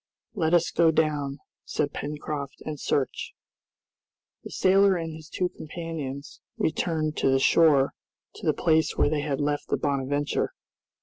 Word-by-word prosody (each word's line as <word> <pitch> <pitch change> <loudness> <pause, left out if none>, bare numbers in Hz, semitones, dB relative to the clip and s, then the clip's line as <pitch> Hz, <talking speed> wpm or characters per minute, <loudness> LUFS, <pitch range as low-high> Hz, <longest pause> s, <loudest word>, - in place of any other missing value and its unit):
"Let 170 -4 +2
us 170 -1 +2
go 170 -1 +4
down," 150 -3 0 0.3
said 145 -1 -2
Pencroft, 145 -1 -5
"and 155 -2 -5
search." 135 -2 -1 1.1
The - - -8
sailor 195 +1 +4
and 165 -2 -3
his 155 0 -11
two 180 -1 -1
companions 155 -5 -7 0.2
returned 155 -1 0
to - - +2
the 135 - +4
shore, 140 -1 +4 0.4
to - - -7
the - - +6
place 160 -1 +2
where - - +3
they 150 -2 0
had 145 -2 -2
left 145 0 -1
the - - 0
"Bonadventure." 145 0 -1
155 Hz, 145 wpm, -26 LUFS, 145-165 Hz, 1.1 s, the